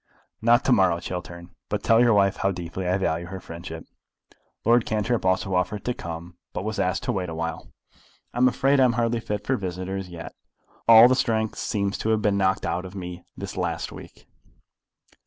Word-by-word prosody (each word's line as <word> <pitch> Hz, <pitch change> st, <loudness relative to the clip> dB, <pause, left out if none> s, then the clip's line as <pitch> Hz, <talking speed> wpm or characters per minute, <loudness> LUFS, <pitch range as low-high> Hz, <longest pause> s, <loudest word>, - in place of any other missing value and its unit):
"Not 120 Hz, +2 st, +4 dB
to -, -, +3 dB
morrow, 95 Hz, -6 st, +4 dB
Chiltern. 85 Hz, 0 st, -7 dB, 0.2 s
But 105 Hz, -1 st, -2 dB
tell 115 Hz, 0 st, +5 dB
your 120 Hz, -2 st, +5 dB
wife 100 Hz, -1 st, +3 dB
how 95 Hz, -, +1 dB
deeply 90 Hz, 0 st, -5 dB
I 90 Hz, +1 st, +2 dB
value 85 Hz, -2 st, -1 dB
her 95 Hz, +1 st, -6 dB
friendship." 85 Hz, -1 st, -8 dB, 0.8 s
Lord 120 Hz, +1 st, +5 dB
Cantrip 110 Hz, +2 st, -1 dB
also 95 Hz, +1 st, +1 dB
offered 90 Hz, +3 st, -1 dB
to 125 Hz, -, 0 dB
come, 85 Hz, -2 st, -8 dB, 0.2 s
but 90 Hz, -, -3 dB
was 110 Hz, +1 st, -3 dB
asked 90 Hz, +5 st, 0 dB
to 125 Hz, -, 0 dB
wait 95 Hz, -6 st, -2 dB
awhile. 80 Hz, 0 st, -5 dB, 0.6 s
"I 120 Hz, -, -3 dB
am 125 Hz, -, +6 dB
afraid 135 Hz, +2 st, +2 dB
I -, -, +6 dB
am 120 Hz, -, +3 dB
hardly 115 Hz, 0 st, 0 dB
fit 105 Hz, -2 st, -4 dB
for 130 Hz, -, +1 dB
visitors 95 Hz, 0 st, -4 dB
yet. 85 Hz, -1 st, -8 dB, 0.5 s
All 115 Hz, +1 st, +10 dB
the 130 Hz, -, +3 dB
strength 110 Hz, -4 st, 0 dB
seems 100 Hz, -1 st, -1 dB
to 110 Hz, -, -1 dB
have 110 Hz, -1 st, +2 dB
been 105 Hz, -1 st, +2 dB
knocked 95 Hz, -2 st, +1 dB
out 85 Hz, +1 st, -1 dB
of 95 Hz, +1 st, -9 dB
me 90 Hz, -2 st, -7 dB
this -, -, -6 dB
last -, -, -2 dB
week." -, -, -12 dB
95 Hz, 195 wpm, -25 LUFS, 90-115 Hz, 0.8 s, All